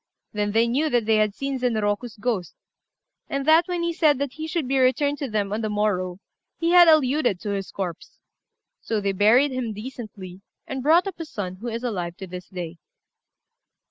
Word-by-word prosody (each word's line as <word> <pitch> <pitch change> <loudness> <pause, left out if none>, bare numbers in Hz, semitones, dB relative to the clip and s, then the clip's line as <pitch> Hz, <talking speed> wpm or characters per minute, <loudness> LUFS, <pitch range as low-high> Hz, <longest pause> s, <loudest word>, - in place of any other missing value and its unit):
Then 205 -1 -1
they 230 +1 +3
knew 285 +7 +1
that 240 -5 +1
they 220 0 +3
had 215 -1 +1
seen 275 -1 -3
Zenroku's 225 -1 -1
ghost; 210 -6 -2 0.7
and 275 0 -2
that 320 +2 +5
when 355 -1 -2
he 340 0 0
said 305 -4 +3
that 280 -1 -3
he 315 +1 -6
should 320 -4 -2
be 270 +1 +1
returned 285 +3 +2
to 280 - -3
them 205 -2 -1
on 220 - -2
the 215 - -2
morrow, 195 -4 -1 0.4
he 335 0 0
had 350 -1 +8
alluded 280 - +3
to 205 - -3
his 195 -1 -3
corpse. 190 - -6 0.6
So 220 -2 -1
they 200 -1 0
buried 225 +9 +4
him 250 -4 -3
decently, 210 -5 -9 0.2
and 265 -1 -4
brought 320 +7 +4
up 385 -3 -6
his 325 -2 -6
son, 185 -3 -5
who 230 +5 -7
is 230 +1 -4
alive 180 -8 -3
to 195 - -7
this 180 0 -9
day. 175 -2 -6
235 Hz, 200 wpm, -24 LUFS, 205-285 Hz, 0.7 s, had